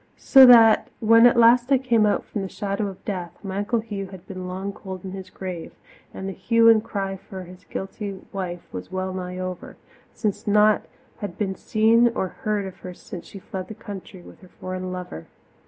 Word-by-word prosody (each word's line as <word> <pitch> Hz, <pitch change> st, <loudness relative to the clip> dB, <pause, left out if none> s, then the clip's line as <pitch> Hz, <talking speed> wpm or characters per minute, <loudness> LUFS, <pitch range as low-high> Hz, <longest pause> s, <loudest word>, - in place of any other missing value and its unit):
So 265 Hz, -2 st, +8 dB
that 225 Hz, -3 st, +7 dB
when 230 Hz, +1 st, +7 dB
at 240 Hz, -, +3 dB
last 240 Hz, +2 st, +5 dB
I 270 Hz, -, +6 dB
came 235 Hz, -4 st, +2 dB
out 205 Hz, -, +1 dB
from 210 Hz, -, -4 dB
the 195 Hz, -, -4 dB
shadow 200 Hz, +1 st, -3 dB
of 195 Hz, -2 st, -10 dB
death, 180 Hz, -4 st, -5 dB
my 195 Hz, 0 st, -4 dB
Uncle 220 Hz, +3 st, 0 dB
Hugh 205 Hz, -3 st, -5 dB
had 190 Hz, -1 st, -12 dB
been 185 Hz, -1 st, -7 dB
long 190 Hz, +2 st, -4 dB
cold 190 Hz, -3 st, -8 dB
in 190 Hz, -, -5 dB
his 190 Hz, -1 st, -8 dB
grave, 180 Hz, -3 st, -7 dB, 0.4 s
and 190 Hz, -, -6 dB
the 195 Hz, -, -4 dB
hue 230 Hz, +3 st, +3 dB
and 220 Hz, -1 st, +5 dB
cry 195 Hz, -3 st, -3 dB
for 190 Hz, 0 st, -9 dB
his 180 Hz, +1 st, -14 dB
guilty 195 Hz, 0 st, -6 dB
wife 180 Hz, -3 st, -4 dB
was 90 Hz, 0 st, -7 dB
well 185 Hz, 0 st, -3 dB
nigh 180 Hz, -1 st, -5 dB
over, 185 Hz, -1 st, -6 dB, 0.3 s
since 210 Hz, -3 st, -3 dB
naught 210 Hz, 0 st, +4 dB, 0.3 s
had 200 Hz, -4 st, -6 dB
been 195 Hz, -3 st, -1 dB
seen 225 Hz, +4 st, +3 dB
or 190 Hz, -, -1 dB
heard 210 Hz, 0 st, -2 dB
of 190 Hz, -, -8 dB
her 180 Hz, -1 st, -9 dB
since 175 Hz, -1 st, -10 dB
she -, -, -10 dB
fled 190 Hz, -1 st, -7 dB
the 220 Hz, -, -8 dB
country 195 Hz, -3 st, -9 dB
with -, -, -15 dB
her 185 Hz, -, -15 dB
foreign 185 Hz, 0 st, -5 dB
lover. 180 Hz, -, -7 dB
195 Hz, 205 wpm, -23 LUFS, 185-215 Hz, 0.4 s, So